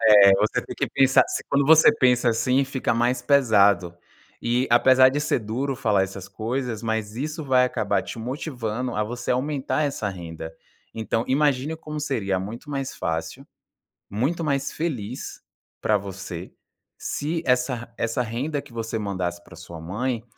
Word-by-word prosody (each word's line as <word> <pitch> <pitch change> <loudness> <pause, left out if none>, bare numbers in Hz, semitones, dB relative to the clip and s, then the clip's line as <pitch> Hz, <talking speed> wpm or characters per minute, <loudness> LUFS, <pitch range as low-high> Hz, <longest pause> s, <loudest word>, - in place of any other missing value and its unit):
eh, 100 -1 +8
você 105 - +1
tem - - -7
que - - -1
pensar, 135 -1 +5 0.3
quando 140 0 +2
você 160 +2 +7
pensa 125 -2 +3
assim 125 +4 +2
fica 130 -2 -1
mais 120 +2 +1
pesado. 100 -10 +3 0.5
E 120 +2 +1
apesar 130 +2 +6
de 145 +3 -2
ser 150 - +1
duro 125 +6 -3
falar 105 -5 +2
essas 95 0 -7
coisas, 120 0 -3
mas 110 -1 -2
isso 155 +5 -4
vai 130 -2 +4
acabar 110 -4 0
te - - -7
motivando 125 -2 -4
a 105 - +1
você 120 +4 -3
aumentar 140 +3 -1
essa 140 -7 -2
renda. 80 -3 -8 0.4
Então 115 +1 -2
imagine 145 +2 +1
como 150 -1 -6
seria 105 -10 -1
muito 110 +9 -7
mais 135 -2 -3
fácil, 80 0 -4 0.6
muito 135 - -1
mais 140 -2 -1
feliz 130 -8 -4 0.4
pra 105 - +3
você, 95 -3 -7 0.4
se 160 +3 -3
essa 125 -2 0
essa 115 +2 -1
renda 135 +6 -3
que 120 - -17
você 115 -1 -3
mandasse 90 -4 -3
pra - - -14
sua 85 -1 -10
mãe, 115 +7 -3
120 Hz, 155 wpm, -24 LUFS, 105-135 Hz, 0.6 s, eh